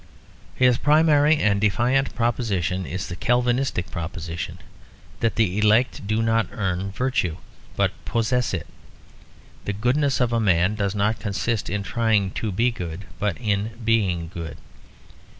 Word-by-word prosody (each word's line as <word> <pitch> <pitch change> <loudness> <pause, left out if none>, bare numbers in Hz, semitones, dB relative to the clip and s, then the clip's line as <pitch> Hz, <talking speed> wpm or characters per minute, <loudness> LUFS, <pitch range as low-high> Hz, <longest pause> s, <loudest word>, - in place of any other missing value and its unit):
His 125 -2 +4
primary 150 0 +4
and 100 -6 +2
defiant 120 +6 +1
proposition 100 -6 -1
is 90 +1 -4
the 85 - -6
Calvinistic 120 -2 0
proposition: 85 0 -5 0.6
that 115 - 0
the 105 -3 +1
elect 110 0 +2
do 110 +2 +1
not 115 0 +2
earn 95 -4 -2
virtue, 100 -8 -1 0.4
but - - +2
possess 120 +1 0
it. 85 -6 -3 1.0
The 100 - -1
goodness 130 +7 +1
of 120 -2 +1
a 115 - +2
man 95 -2 +3
does 100 -1 -1
not 105 +2 +1
consist 110 +2 -2
in 105 -1 -2
trying 110 -3 +1
to 110 +2 -3
be 115 +6 +2
good, 90 -3 -6
but 105 -3 -1
in 105 -1 -1
being 95 -7 +1
good. 85 -3 -6
105 Hz, 140 wpm, -23 LUFS, 95-120 Hz, 1.0 s, His